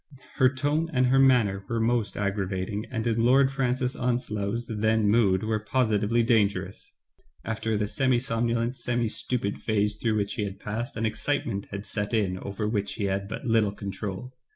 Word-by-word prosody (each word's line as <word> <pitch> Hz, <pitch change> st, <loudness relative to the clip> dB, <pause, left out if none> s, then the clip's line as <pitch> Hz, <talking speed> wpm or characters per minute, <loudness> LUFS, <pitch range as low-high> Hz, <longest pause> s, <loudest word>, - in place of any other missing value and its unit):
Her 130 Hz, -, +6 dB
tone 145 Hz, +5 st, -1 dB
and 130 Hz, -3 st, +2 dB
her 130 Hz, +2 st, +4 dB
manner 115 Hz, -8 st, +4 dB
were 115 Hz, -1 st, 0 dB
most 115 Hz, -1 st, 0 dB
aggravating, 100 Hz, 0 st, -2 dB
and 115 Hz, -2 st, -3 dB
in 115 Hz, -1 st, +1 dB
Lord 135 Hz, +3 st, +5 dB
Francis 130 Hz, -1 st, 0 dB
Onslow's 115 Hz, -2 st, -1 dB
then 110 Hz, -1 st, +1 dB
mood 100 Hz, -3 st, +3 dB
were 110 Hz, 0 st, 0 dB
positively 110 Hz, 0 st, +1 dB
dangerous. 100 Hz, -5 st, 0 dB, 0.5 s
After 110 Hz, -1 st, -1 dB
the 105 Hz, 0 st, 0 dB
semi 130 Hz, +2 st, +2 dB
somnolent, 120 Hz, -1 st, -1 dB
semi 120 Hz, -2 st, -1 dB
stupid 105 Hz, -3 st, -2 dB
phase 105 Hz, -1 st, +1 dB
through 115 Hz, -2 st, 0 dB
which 100 Hz, -1 st, -1 dB
he 110 Hz, -, -2 dB
had 100 Hz, -1 st, -5 dB
passed, 115 Hz, +3 st, -4 dB
an 115 Hz, -, 0 dB
excitement 110 Hz, -3 st, -2 dB
had 100 Hz, +1 st, -6 dB
set 105 Hz, +2 st, -2 dB
in 95 Hz, -4 st, 0 dB
over 100 Hz, +2 st, -4 dB
which 105 Hz, -2 st, -1 dB
he 105 Hz, -, -4 dB
had 100 Hz, 0 st, -1 dB
but 110 Hz, -, -6 dB
little 110 Hz, -4 st, +2 dB
control. 100 Hz, +4 st, -6 dB
110 Hz, 175 wpm, -27 LUFS, 100-120 Hz, 0.5 s, Her